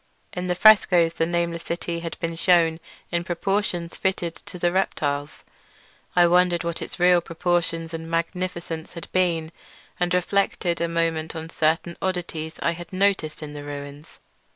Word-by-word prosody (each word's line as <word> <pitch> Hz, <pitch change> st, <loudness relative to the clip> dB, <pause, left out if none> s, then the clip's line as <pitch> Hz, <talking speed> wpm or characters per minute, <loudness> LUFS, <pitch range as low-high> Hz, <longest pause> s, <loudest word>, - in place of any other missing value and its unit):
In 180 Hz, 0 st, -3 dB
the 180 Hz, -, +1 dB
frescoes 180 Hz, -5 st, +6 dB
the 165 Hz, -, 0 dB
nameless 170 Hz, -1 st, -1 dB
city 170 Hz, 0 st, -3 dB
had 165 Hz, -1 st, -6 dB
been 165 Hz, 0 st, -2 dB
shewn 165 Hz, -2 st, +3 dB, 0.3 s
in 170 Hz, -1 st, 0 dB
proportions 175 Hz, -1 st, -1 dB
fitted 180 Hz, -3 st, -1 dB
to -, -, -7 dB
the 175 Hz, 0 st, +1 dB
reptiles. 145 Hz, -6 st, -1 dB, 0.7 s
I 175 Hz, -1 st, +7 dB
wondered 175 Hz, 0 st, +3 dB
what 170 Hz, 0 st, -3 dB
its -, -, -6 dB
real 180 Hz, 0 st, +5 dB
proportions 165 Hz, -1 st, -1 dB
and 165 Hz, 0 st, -5 dB
magnificence 170 Hz, -1 st, -3 dB
had 170 Hz, -, -8 dB
been, 170 Hz, -3 st, +1 dB, 0.5 s
and 175 Hz, 0 st, +1 dB
reflected 180 Hz, -1 st, +1 dB
a 170 Hz, -, +2 dB
moment 165 Hz, -1 st, -1 dB
on 160 Hz, 0 st, -6 dB
certain 165 Hz, +2 st, 0 dB
oddities 170 Hz, -4 st, -3 dB
I 170 Hz, -, +3 dB
had 170 Hz, 0 st, -8 dB
noticed 185 Hz, -5 st, 0 dB
in 150 Hz, -1 st, -7 dB
the 145 Hz, -1 st, -7 dB
ruins. 145 Hz, +1 st, -8 dB
170 Hz, 155 wpm, -24 LUFS, 165-180 Hz, 0.7 s, I